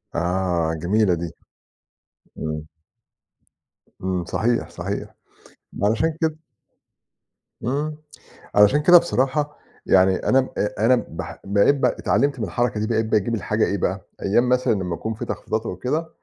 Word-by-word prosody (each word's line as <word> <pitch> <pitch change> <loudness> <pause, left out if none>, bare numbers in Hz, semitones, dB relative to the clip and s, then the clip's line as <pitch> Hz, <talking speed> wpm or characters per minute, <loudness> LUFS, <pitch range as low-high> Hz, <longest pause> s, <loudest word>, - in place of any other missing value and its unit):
آه، 85 -1 0
جميلة 100 +1 +2
دي. 85 -1 -6 1.0
إمم. 75 -1 -4 1.4
إمم. 90 -2 -1
صحيح، 115 +7 0
صحيح. - - -5 0.7
علشان 115 +10 +1
كده 160 -1 0 1.3
إمم، 150 +5 -2 0.6
علشان 105 +9 +5
كده 175 +3 +9
بصراحة 145 -2 0 0.3
يعني، 95 0 +5
أنا 130 0 +2 0.3
أنا 120 +3 +3
بح - - -7
بقيت 100 +8 +4
ب 140 - -3
اتعلَّمت 140 -2 +1
من 110 - 0
الحركة 110 +3 -1
دي، 110 - 0
بقيت 110 -1 0
باجيب 110 +1 +1
الحاجة 110 0 0
إيه 100 - -1
بقى، 95 +1 -2 0.2
أيَّام 120 +5 +2
مثلًا 125 -1 +2
لمَّا 90 -4 -2
يكون 110 +4 -4
فيه - - -6
تخفيضات 110 +1 -3
أو - - -4
كده، 150 - -2
110 Hz, 135 wpm, -22 LUFS, 95-130 Hz, 1.4 s, كده